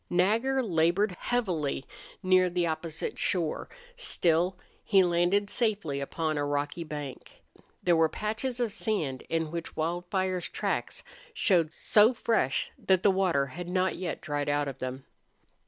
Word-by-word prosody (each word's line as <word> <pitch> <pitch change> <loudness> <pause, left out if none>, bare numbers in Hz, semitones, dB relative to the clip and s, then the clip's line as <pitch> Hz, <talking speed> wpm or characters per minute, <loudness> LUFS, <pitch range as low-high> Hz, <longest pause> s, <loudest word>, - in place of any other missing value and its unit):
Nagger 225 +9 +2
labored 180 +1 +2
heavily 175 - -1 0.4
near 185 0 +4
the 175 0 0
opposite 160 0 -3
shore; 170 -4 0 0.3
still, 175 +2 +1 0.3
he 195 -2 +5
landed 175 +3 +2
safely 200 - 0
upon 155 +2 -2
a - - 0
rocky 145 +3 -2
bank. 150 -4 -8 0.4
There 175 - +4
were 160 -1 +4
patches 220 +6 -3
of 235 -4 0
sand 155 - -2
in 165 -1 -1
which 170 -1 -5
Wildfire's 175 +3 -1
tracks - - -2 0.3
showed 170 - +3
so 220 +4 +4
fresh 220 - 0
that 190 -1 +2
the 200 - +6
water 185 -7 +2
had 175 +6 -7
not 185 +1 +1
yet 180 -2 -4
dried 145 -2 -2
out 145 0 +1
of 135 - -6
them. 130 +1 -5
175 Hz, 140 wpm, -29 LUFS, 155-195 Hz, 0.4 s, the